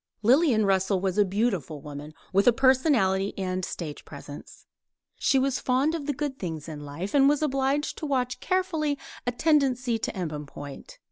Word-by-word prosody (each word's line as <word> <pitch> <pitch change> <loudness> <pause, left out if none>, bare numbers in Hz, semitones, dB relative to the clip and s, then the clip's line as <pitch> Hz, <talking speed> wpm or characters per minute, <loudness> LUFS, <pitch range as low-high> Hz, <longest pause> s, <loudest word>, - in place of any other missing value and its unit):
Lillian 245 -2 +4
Russell 190 0 +2
was 190 +1 -1
a - - +7
beautiful 190 - -1
woman, 150 +2 -9 0.2
with 195 +4 +3
a - - +9
personality 240 -7 +2
and 185 -1 -2
a - - -2
stage 155 -4 -6
presence. 145 0 -11 0.5
She 270 - +3
was 265 0 +1
fond 265 +5 +1
of 310 -4 -4
the 290 - +1
good 280 -1 -4
things 160 -4 -5
in 155 -2 -7
life, 145 +7 -6
and 275 -1 +6
was 295 +1 +1
obliged 275 +1 0
to 310 - -4
watch 255 -3 -1
carefully 325 -6 0 0.3
a - - +3
tendency 255 -4 +2
to - - -2
embonpoint. 150 - -7
235 Hz, 175 wpm, -26 LUFS, 185-280 Hz, 0.5 s, a